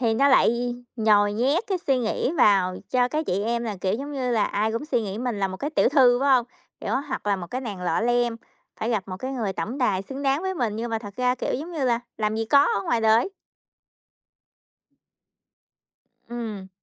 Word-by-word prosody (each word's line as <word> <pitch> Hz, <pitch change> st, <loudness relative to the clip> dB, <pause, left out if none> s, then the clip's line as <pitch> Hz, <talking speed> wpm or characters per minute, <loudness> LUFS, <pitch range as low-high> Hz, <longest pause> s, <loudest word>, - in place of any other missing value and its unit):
Thì 230 Hz, -3 st, +2 dB
nó 275 Hz, +5 st, +4 dB
lại 245 Hz, -2 st, +3 dB, 0.2 s
nhồi 210 Hz, -2 st, +3 dB
nhét 270 Hz, -, +1 dB
cái 380 Hz, -2 st, -1 dB
suy 270 Hz, -2 st, +3 dB
nghĩ 245 Hz, +4 st, -1 dB
vào 190 Hz, -5 st, +4 dB
cho 250 Hz, -1 st, +2 dB
các 310 Hz, +3 st, -2 dB
chị 195 Hz, +3 st, 0 dB
em 235 Hz, +1 st, -1 dB
là, 215 Hz, -3 st, -3 dB
kiểu 190 Hz, +1 st, 0 dB
giống 280 Hz, +5 st, -5 dB
như 255 Hz, -3 st, -2 dB
là, 220 Hz, -3 st, +2 dB
ai 215 Hz, +2 st, -1 dB
cũng 230 Hz, +5 st, -3 dB
suy 250 Hz, -6 st, 0 dB
nghĩ 200 Hz, 0 st, -5 dB
mình 245 Hz, -4 st, -2 dB
là 195 Hz, -, +1 dB
một 190 Hz, -, -6 dB
cái 290 Hz, +9 st, -3 dB
tiểu -, -, +3 dB
thư, 255 Hz, -3 st, +5 dB
phải 280 Hz, -, +2 dB
hông? 245 Hz, -2 st, +2 dB, 0.3 s
Kiểu, -, -, -3 dB, 0.2 s
hoặc 260 Hz, -, -4 dB
là 200 Hz, -1 st, +2 dB
một 175 Hz, -, -6 dB
cái 255 Hz, +8 st, -4 dB
nàng 210 Hz, -8 st, -6 dB
lọ 175 Hz, 0 st, 0 dB
lem, 240 Hz, 0 st, +1 dB, 0.4 s
phải 225 Hz, -, -1 dB
gặp 210 Hz, -5 st, -1 dB
một 185 Hz, -, -5 dB
cái 260 Hz, +4 st, -4 dB
người 225 Hz, -7 st, -2 dB
tổng 205 Hz, +10 st, -4 dB
tài 205 Hz, -7 st, +1 dB
xứng 270 Hz, +7 st, -7 dB
đáng 275 Hz, +4 st, +1 dB
với 380 Hz, 0 st, -2 dB
mình. 230 Hz, -8 st, -1 dB
Nhưng 235 Hz, +1 st, -3 dB
mà 225 Hz, -, 0 dB
thật 205 Hz, -3 st, -10 dB
ra, 250 Hz, 0 st, +2 dB
kiểu 255 Hz, -, -2 dB
giống 315 Hz, +7 st, -5 dB
như 305 Hz, -5 st, -2 dB
là, 240 Hz, -2 st, +2 dB, 0.2 s
làm 215 Hz, 0 st, -1 dB
gì 225 Hz, -, -1 dB
có 280 Hz, +5 st, +5 dB, 0.2 s
ở -, -, -4 dB
ngoài 235 Hz, -, +1 dB
đời! 225 Hz, -, +3 dB, 3.0 s
Ừm. 220 Hz, -5 st, -6 dB
235 Hz, 230 wpm, -24 LUFS, 210-260 Hz, 3.0 s, thư